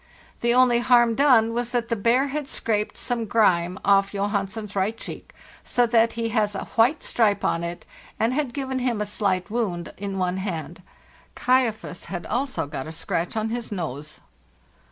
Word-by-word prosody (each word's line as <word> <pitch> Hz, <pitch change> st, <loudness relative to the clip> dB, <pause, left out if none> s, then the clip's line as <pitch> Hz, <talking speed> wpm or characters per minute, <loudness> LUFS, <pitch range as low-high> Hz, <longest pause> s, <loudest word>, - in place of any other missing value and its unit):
The 235 Hz, -, +2 dB
only 250 Hz, -2 st, +5 dB
harm 240 Hz, -1 st, +4 dB
done 230 Hz, -4 st, +4 dB
was 240 Hz, +1 st, -2 dB
that 235 Hz, -1 st, 0 dB
the 230 Hz, -, +1 dB
bear 235 Hz, +6 st, +2 dB
had 290 Hz, 0 st, -3 dB
scraped 210 Hz, -2 st, -1 dB
some 240 Hz, -2 st, -2 dB
grime 185 Hz, -5 st, +2 dB
off 195 Hz, 0 st, +4 dB
Johansen's 200 Hz, +1 st, -2 dB
right 200 Hz, +4 st, 0 dB
cheek, -, -, -9 dB, 0.3 s
so 245 Hz, -, +2 dB
that 230 Hz, -1 st, +3 dB
he 230 Hz, 0 st, -2 dB
has 215 Hz, -2 st, 0 dB
a -, -, -3 dB
white 240 Hz, +7 st, +3 dB
stripe 215 Hz, -4 st, +1 dB
on 170 Hz, -, 0 dB
it, 170 Hz, 0 st, -5 dB, 0.3 s
and 230 Hz, +3 st, +2 dB
had 285 Hz, -2 st, -1 dB
given 265 Hz, -1 st, -3 dB
him 245 Hz, -3 st, 0 dB
a 210 Hz, -, 0 dB
slight 200 Hz, -2 st, -1 dB
wound 185 Hz, -8 st, -2 dB
in 200 Hz, -1 st, -4 dB
one 185 Hz, 0 st, 0 dB
hand; 175 Hz, -3 st, -5 dB, 0.3 s
' -, -, -29 dB
Kaifas' 245 Hz, -8 st, 0 dB
had 175 Hz, 0 st, -5 dB
also 255 Hz, -, -1 dB
got 140 Hz, 0 st, -6 dB
a -, -, -6 dB
scratch 165 Hz, +4 st, -2 dB
on 220 Hz, 0 st, 0 dB
his 235 Hz, 0 st, -4 dB
nose. 150 Hz, -5 st, -5 dB
220 Hz, 180 wpm, -24 LUFS, 190-240 Hz, 0.3 s, only